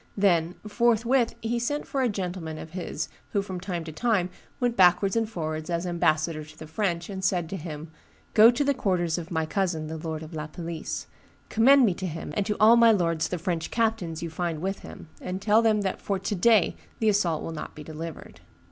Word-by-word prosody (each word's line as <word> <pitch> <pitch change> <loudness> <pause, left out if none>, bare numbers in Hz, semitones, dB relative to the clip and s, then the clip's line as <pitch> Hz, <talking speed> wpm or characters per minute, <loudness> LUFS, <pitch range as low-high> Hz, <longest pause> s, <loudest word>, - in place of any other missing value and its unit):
Then, 175 -3 +2
forthwith 235 +2 +2
he 235 +1 0
sent 290 +5 -2
for 270 - -2
a 250 - +2
gentleman 180 -5 -4
of 160 - -9
his 180 0 -4 0.3
who 200 - +1
from 190 -3 -5
time 175 -2 -4
to 160 - -7
time 185 0 0 0.3
went 245 -2 +1
backwards 190 +1 +4
and 225 -1 +1
forwards 155 -4 -4
as 170 +1 -1
ambassador 155 -2 +1
to 155 +1 -15
the 155 - -8
French, 170 0 -2
and 190 -2 -6
said 180 -3 +1
to 195 - -4
him, 155 -2 -7 0.4
'Go 220 +1 +9
to 245 +4 +1
the 280 0 +2
quarters 180 -9 0
of 170 0 -8
my 160 -3 0
cousin, 170 -2 -1
the 160 +1 -5
lord 160 -1 -4
of 160 +2 -10
La 155 -1 -4
Palisse; 165 0 -5 0.4
commend 260 +4 +6
me 195 - +2
to 185 +1 -4
him 160 -2 -6
and 205 -1 0
to 210 - -1
all 225 +2 +7
my 230 -1 +7
lords 165 -5 +1
the 180 - -3
French 170 -1 -2
captains 220 -8 -1
you 165 - -4
find 165 -1 -2
with 195 +4 -2
him, - - -11
and 185 +1 -4
tell 215 +3 +4
them 220 -2 +3
that 190 -2 -2
for 200 - -1
to 195 +2 -3
day 205 0 +4 0.2
the 220 - 0
assault 180 -6 +1
will - - -4
not 155 - -7
be 150 - -8
delivered. 160 +1 -8
180 Hz, 220 wpm, -26 LUFS, 165-215 Hz, 0.4 s, Go